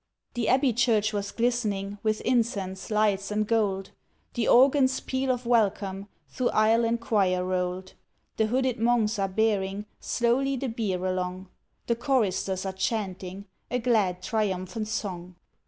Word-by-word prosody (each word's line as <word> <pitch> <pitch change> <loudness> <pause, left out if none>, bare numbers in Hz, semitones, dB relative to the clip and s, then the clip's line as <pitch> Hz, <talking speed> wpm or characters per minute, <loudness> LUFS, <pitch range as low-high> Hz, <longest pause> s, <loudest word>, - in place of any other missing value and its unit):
The 240 -3 -1
Abbey 260 -1 +3
Church 220 -2 +2
was 200 -1 -2
glistening 210 -4 -1
With 215 -1 0
incense, 215 -6 -1
lights, 210 -2 +1
and 210 0 0
gold, 200 -4 0 0.4
The 235 -2 -1
organ's 260 +1 +5
peal 265 0 -2
of 250 -1 -1
welcome, 200 -4 +1 0.2
Through 250 -2 -1
aisle 220 +2 +3
and 230 +1 0
choir 190 -5 +1
rolled. 185 0 -2 0.4
The 220 - +2
hooded 255 0 0
Monks 225 -2 +2
are 195 - +1
bearing 200 0 0
Slowly 255 +3 +1
the 260 0 -3
bier 200 -5 -2
along, 185 0 -3 0.4
The 235 - +1
choristers 205 -7 0
are 190 - -3
chanting 190 -1 -3 0.2
A 250 - 0
glad 210 -7 +1
triumphant 205 -1 -2
song. 180 -4 -4
215 Hz, 140 wpm, -27 LUFS, 190-235 Hz, 0.4 s, organ's